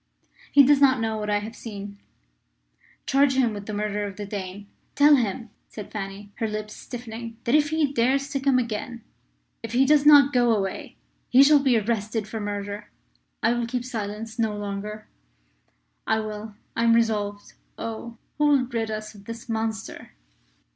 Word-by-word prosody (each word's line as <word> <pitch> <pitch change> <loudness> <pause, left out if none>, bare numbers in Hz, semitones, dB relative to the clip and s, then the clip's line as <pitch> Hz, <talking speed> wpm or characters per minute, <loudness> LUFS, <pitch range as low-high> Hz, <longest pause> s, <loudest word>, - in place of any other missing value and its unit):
"He 280 - +8
does 280 +1 +4
not 260 -2 +5
know 220 -1 -1
what 210 0 -3
I 205 - +2
have 215 +2 -6
seen. 200 -2 -8 1.1
Charge 275 0 +3
him 245 -4 +2
with 205 -1 -7
the 215 - -4
murder 210 0 -2
of 200 -1 -6
the 205 - -6
Dane. 195 0 -6 0.3
Tell 290 +1 +7
him," 230 -2 -2 0.2
said 210 -2 -9
Fanny, 200 0 -6
her 225 - -1
lips 215 0 -5
stiffening, 230 -1 -8
"that 235 - 0
if 295 -1 +4
he 310 -3 0
dares 270 +3 +2
to 275 - -2
come 270 -1 +3
again 235 0 -3 0.6
if 230 -1 -7
he 260 +2 +4
does 295 +1 +4
not 290 -2 +7
go 240 -2 +4
away 195 -2 -4 0.3
he 260 +2 +7
shall 295 +1 +6
be 265 -4 +3
arrested 215 0 -2
for 220 +1 -5
murder. 205 0 -5 0.5
I 230 - +4
will 240 -1 -1
keep 245 0 -3
silence 220 -1 -5
no 220 -2 0
longer!" 205 +1 -5 1.0
"I 220 - +2
will 215 0 -6 0.2
I 230 - 0
am 230 0 +5
resolved! 210 -3 -1 0.2
Oh! 230 +1 -6 0.2
who 300 - +4
will 280 -3 +4
rid 230 -2 -3
us 215 0 -5
of 200 -1 -15
this 230 +3 -8
monster?" 220 -2 -4
225 Hz, 175 wpm, -25 LUFS, 210-250 Hz, 1.1 s, He